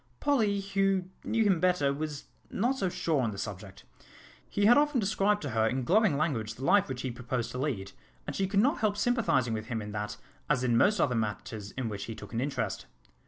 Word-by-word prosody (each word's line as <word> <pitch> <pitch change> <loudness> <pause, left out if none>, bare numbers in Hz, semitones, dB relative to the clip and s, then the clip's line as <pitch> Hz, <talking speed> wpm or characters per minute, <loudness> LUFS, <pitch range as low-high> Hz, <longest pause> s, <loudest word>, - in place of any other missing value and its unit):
Polly, 220 -9 +2
who 195 -1 +1 0.2
knew 225 0 +1
him 195 -5 +3
better, 175 -6 +2
was 150 0 -4 0.3
not 245 +7 0
so 190 - +1
sure 170 -5 0
on 115 - 0
the 100 - -6
subject. 95 -1 -7 0.7
He 205 - +1
had 240 +3 +8
often 295 -2 +3
described 210 -1 +1
to 145 - -3
her 110 0 +2
in 130 +2 -1
glowing 190 - +3
language 115 -8 -1
the 130 - -6
life 200 +7 +4
which 130 -1 -4
he 130 - -2
proposed 120 -1 -3
to 125 - -5
lead, 110 -9 -2 0.3
and - - -5
she 195 - 0
could 200 +1 +3
not 270 +6 +2
help 210 -2 +1
sympathising 210 - +1
with 110 0 -4
him 115 -2 -2
in 105 -1 -6
that 105 0 -4 0.3
as 130 -4 +2
in 120 -2 +2
most 205 - +4
other 135 -6 +2
matters 110 -1 -3
in 130 -3 -3
which 105 -2 -4
he 115 - -6
took - - -11
an 115 - -1
interest. 125 -7 -3
140 Hz, 220 wpm, -29 LUFS, -, 0.7 s, had